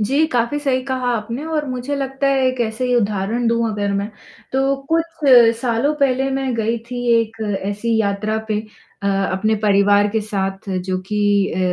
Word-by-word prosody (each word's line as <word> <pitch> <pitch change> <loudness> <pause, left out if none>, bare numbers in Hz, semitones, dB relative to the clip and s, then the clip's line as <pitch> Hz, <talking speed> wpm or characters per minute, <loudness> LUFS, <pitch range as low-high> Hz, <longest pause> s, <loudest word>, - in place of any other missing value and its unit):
जी, 275 +9 +2
काफ़ी 240 +4 +1
सही 265 -3 0
कहा 260 -2 -2
आपने 230 +5 -4
और 315 -2 -1
मुझे 255 +2 -3
लगता 270 0 -2
है 270 -1 +2
एक 255 -1 -1
ऐसे 225 +2 -1
ही 250 - +1
उदाहरण 210 +2 0
दूँ 230 0 +1
अगर 205 -1 -2
मैं, 200 +1 -1 0.4
तो 270 +1 +2 0.2
कुछ 330 -2 -1 0.3
सालों 245 +4 +1
पहले 270 -2 +1
मैं 270 -1 -1
गई 230 +1 0
थी 245 0 -4 0.2
एक 225 0 -5 0.3
ऐसी 210 +4 -1
यात्रा 210 +1 -1
पे 210 -1 0 0.4
अ, - - -1 0.3
अपने 215 +4 +1
परिवार 205 0 +4
के 220 +2 -1
साथ 195 -1 -4 0.2
जो 185 0 0
कि 210 - -1 0.3
अ, 175 - -3
235 Hz, 180 wpm, -19 LUFS, 210-265 Hz, 0.4 s, परिवार